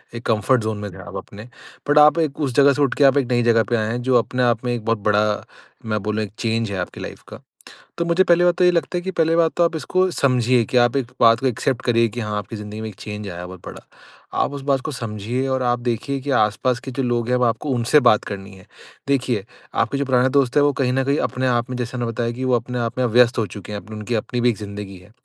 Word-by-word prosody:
एक 120 - -8
comfort 115 +3 +2
zone 110 -1 -2
में 105 -1 -6
थे - - -11
आप - - -10
अपने। 105 +2 -9 0.5
बट 145 - +3
आप 150 +2 +6
एक 155 -4 -1
उस 135 -3 -1
ज़गह 140 0 +6
से 145 - -2
उठ 135 -3 +2
के 145 - +2
आप 135 0 +5
एक 135 - +1
नई 120 -1 +2
ज़गह 115 -1 +4
पे 120 - +2
आए 110 -1 -1
हैं 120 - -3
जो 125 0 +3
अपने 125 +2 -1
आप 120 0 +1
में 120 - 0
एक 115 -3 -4
बहुत 115 -1 +1
बड़ा 105 0 +1 0.4
मैं 110 -1 -1
बोलूँ 105 +1 -1
एक 100 - -7
चेंज 115 -2 -1
है 95 - -3
आपकी 90 - -6
लाइफ - - -8
का। - - -10 0.6
तो 170 - 0
मुझे 170 +2 +3
पहली 175 0 +4
बात 175 0 +4
तो 180 - +3
ये 180 - +6
लगता 175 +1 -1
है - - -5
कि 190 - -3
पहली 165 -2 +1
बात 165 -1 +3
तो 175 - +4
आप 170 -1 0
इसको 185 +4 0
समझिए 125 -5 +2
कि 125 - -3
आप 120 +2 +3
एक 130 -3 0
बात 115 -1 +5
को 135 - -1
एक्सेप्ट 130 +1 -1
करिए 115 -1 +3
कि 120 +3 -6
हाँ, 105 -1 -3
आपकी 105 +2 -7
जिंदगी 105 +1 -7
में 110 - -4
एक 105 - -10
चेंज 105 +1 -7
आया 85 -2 -7
है 90 - -6
बहुत 90 -1 -11
बड़ा। - - -10 0.5
आप - - +1
उस 140 -1 -6
बात 135 -1 +1
को 155 - -5
समझिए 115 +1 -3
और 130 -1 0
आप 120 0 +1
देखिए 125 +3 -2
कि 140 +2 -4
आस-पास 120 +2 +1
के 135 - -7
जो 135 +1 -3
लोग 120 -2 -1
हैं 125 - +2
वो 125 - +2
आपको 120 +5 -1
उनसे 120 +5 +3
बात 105 -6 +4
करनी 100 -1 -7
है। 95 - -17 0.4
देखिए 125 -7 0 0.3
आपके 140 - 0
जो 140 - 0
पुराने 130 -1 +2
दोस्त 135 -1 +1
थे - - +6
वो 145 0 +3
कहीं 125 -1 +1
न 135 0 +1
कहीं 140 +2 +1
अपने 130 +1 -1
आप 120 0 0
में 125 - -3
जैसे 125 +1 -4
मैंने 120 -1 -2
बताया 115 +1 -2
कि 130 +2 -5
वो 130 -1 +2
अपने 125 +1 -4
आप 120 +1 -3
में 130 - +2
व्यस्त 120 +1 +4
हो 110 - +1
चुके 105 0 -9
हैं 100 - -4
अपन 110 0 -11
उनकी 105 +3 -4
अपनी 120 +2 -2
भी 120 - +3
एक 115 - -3
ज़िंदगी 100 -2 -8
है। 90 +3 -19
120 Hz, 290 wpm, -21 LUFS, 110-135 Hz, 0.6 s, आप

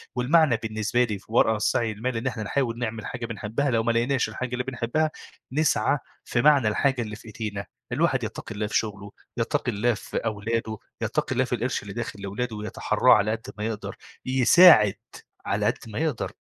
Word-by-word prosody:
والمعنى 135 0 +4
بالنسبة 110 +2 0
لي 105 -5 -3
في - - -22
ورا 110 -1 +3
السعي 110 +1 0
للمال 115 +3 -3
إن 125 +3 -2
إحنا 115 -4 -3
نحاول 120 0 -1
نعمل 110 -1 -3
حاجة 120 -2 -5
بنحبها، 115 +5 -2
لو 115 -1 +2
ما 115 - +2
لقيناش 120 +3 +1
الحاجة 130 -1 -4
اللي 125 0 -1
بنحبها، 135 +5 -1 0.4
نسعى 150 0 +2 0.3
في 120 - 0
معنى 140 -6 +5
الحاجة 130 +4 +1
اللي 105 -2 -5
في 115 - -15
إيدينا. 105 -1 -5 0.4
الواحد - - +1
يتّقي 110 - -6
الله 105 0 -2
في - - +1
شغله، 100 -2 -4 0.3
يتّقي 120 +2 0
الله 115 +3 +1
في 105 - -6
أولاده، 110 +1 -2 0.2
يتّقي - - -1
الله 130 +1 +2
في 125 -1 -1
القرش 120 0 -2
اللي 100 -1 -8
داخل 115 -3 -5
لولاده 110 +4 -3
ويتحرّاه 105 0 +2
على 105 +2 +3
قد 115 +4 -5
ما 105 - -3
يقدر، 110 -2 -4 0.3
يساعد 130 - +7 0.5
على - - 0
قد - - +1
ما 110 +5 -5
يقدر. 155 -7 -1
115 Hz, 190 wpm, -25 LUFS, 110-130 Hz, 0.5 s, يساعد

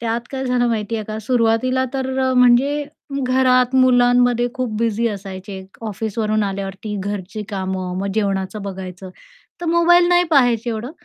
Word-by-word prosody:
त्यात 230 0 -1
काय 265 -1 -4
झालं 250 -1 +1
माहितीये 220 -1 -2
का 215 +1 -5
सुरुवातीला 245 +2 +1
तर 265 -1 -2
अ, 260 0 +1
म्हणजे 255 +4 +4 0.4
घरात 255 0 +3
मुलांमध्ये 245 -1 +4
खूप 255 -4 -2
बिझी 230 0 0
असायचे, 195 -1 -7 0.2
ऑफिसवरून 215 0 -1
आल्यावरती 195 +1 -4
घरची 205 +1 -5
कामं, 190 -2 -3
मग 195 - -2
जेवणाचं 195 -1 -1
बघायचं 190 -1 -7 0.5
तर 350 - -4
मोबाईल 345 +1 +4
नाही 355 0 +4
पाहायचे 245 -5 +3
एवढं. 230 +4 -4
230 Hz, 140 wpm, -20 LUFS, 200-255 Hz, 0.5 s, म्हणजे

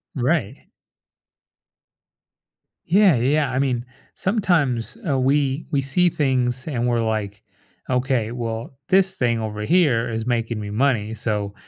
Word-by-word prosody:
Right. 130 -3 -1 2.2
Yeah, 190 -2 +5
yeah, 115 - -1 0.3
yeah. - - -5
I 130 - -1
mean, 125 -3 0 0.3
sometimes, 170 - 0
uh, 140 -3 +1
we 140 +2 +1
we 140 -3 +1
see 175 +7 +2
things 130 -4 0
and 125 -5 -1
we're 120 -1 +1
like, 105 -3 -2 0.5
"Okay. 125 -3 0
Well, 115 +1 -5
this 190 0 +3
thing 120 -2 +1
over 105 -1 -4
here 140 -4 +2
is 115 -1 -3
making 115 -2 -1
me 105 -1 -5
money, 110 -1 0
so 105 -3 -2
125 Hz, 135 wpm, -22 LUFS, 115-140 Hz, 2.2 s, Yeah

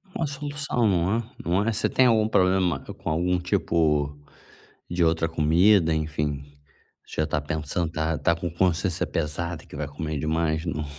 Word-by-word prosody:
Uma 165 - -1
solução, 145 -4 -1
não 95 +1 +2
é? 120 - -2 0.2
Não 90 +5 +1
é? - - +3
Você 110 +1 0
tem 130 - +4
algum 110 -3 +4
problema 90 -6 +2
com 70 - -7
algum 90 +3 +1
tipo, 80 -5 +1 0.7
de 85 0 +2
outra 80 0 +2
comida, 80 +3 +4
enfim. 75 -2 -2 0.6
Você - - -3
já - - +3
está 75 -1 -1
pensando, 80 +2 -2
está 80 0 -1
está 85 +2 +1
com 85 +1 -4
consciência 90 +1 0
pesada 80 +1 -3
que - - -12
vai 75 -1 -3
comer 75 +1 -4
demais, 80 +2 0
não? 75 -2 -3
85 Hz, 170 wpm, -25 LUFS, 75-95 Hz, 0.7 s, tem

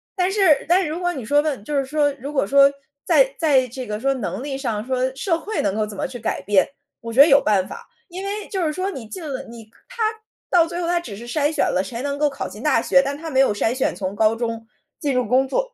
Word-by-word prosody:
但 370 -1 +1
是 380 -8 +3
但 360 +2 +5
是 360 - -2
如 320 +4 -4
果 355 0 +1
你 265 -9 -6
说 290 +5 +3
问 295 -7 -2
就 295 - -3
是 275 - +2
说， 290 +1 +1
如 280 +1 -7
果 270 -9 0
说 280 +3 +6 0.3
在 - - +3
在 275 -6 +3
这 255 +1 -7
个 210 -2 -4
说 275 +3 +1
能 240 -4 -4
力 275 0 -4
上， 230 -6 -3
说 260 0 -1
社 330 +4 0
会 430 +6 -3
能 200 -1 -1
够 215 0 0
怎 210 -1 -9
么 - - -2
去 260 -2 -8
改 225 - -3
变， 190 0 +2 0.3
我 230 -1 -6
觉 240 - -2
得 285 - +10
有 280 -2 +6
办 195 -3 +1
法， - - -9 0.2
因 370 +2 -7
为 410 +1 -4
就 375 -4 -2
是 305 - 0
说 370 +5 -2
你 265 - -7
进 365 - -8
了， 270 -3 -4
你 230 -1 -11 0.2
它 - - -7 0.5
到 340 -2 +5
最 345 +1 -5
后 335 - -2
它 350 0 +2
只 225 -12 -8
是 235 +3 -10
筛 290 +4 0
选 315 - +1
了， 185 - +1
谁 230 +5 -6
能 280 0 -2
够 300 0 +3
考 275 - -5
进 - - -10
大 - - +3
学， 275 - +4
但 280 +1 -3
它 325 +2 -7
没 265 - +2
有 270 - +5
筛 225 +3 0
选 260 -7 -1
从 190 +1 -4
高 220 +1 +3
中 230 -1 -4 0.3
进 285 -3 -1
入 250 -1 +1
工 260 +4 +3
作。 - - -2
275 Hz, 300 characters per minute, -22 LUFS, 230-325 Hz, 0.5 s, 得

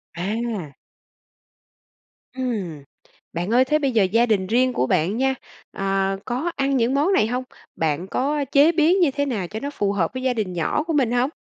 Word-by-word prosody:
À. 200 - -3 1.6
Ừm. 205 - -3 0.5
Bạn 175 +6 -2
ơi 255 +2 +5
thế 300 +3 +2
bây 275 -3 0
giờ 220 -4 +3
gia 225 +6 +3
đình 205 -5 +1
riêng 250 +4 +2
của 130 - 0
bạn 180 +11 +1
nha, 265 +1 +1 0.4
à, 195 0 -1
có 260 +8 -2
ăn 275 0 +1
những 240 +1 +1
món 300 +8 +2
này 215 - +3
hông? 250 +2 -2 0.3
Bạn 160 +3 -1
có 285 +7 -1
chế 290 +4 +6
biến 340 +3 +3
như 335 -6 +4
thế 285 +1 -1
nào 215 -10 -2
cho 215 +5 -6
nó 280 - -4
phù 205 -8 -1
hợp 185 -5 -1
với 255 0 -5
gia 260 -1 +1
đình 210 -6 -3
nhỏ 175 - 0
của 325 0 -3
mình 265 -6 +2
hông? 245 +2 +2
240 Hz, 200 wpm, -22 LUFS, 195-275 Hz, 1.6 s, chế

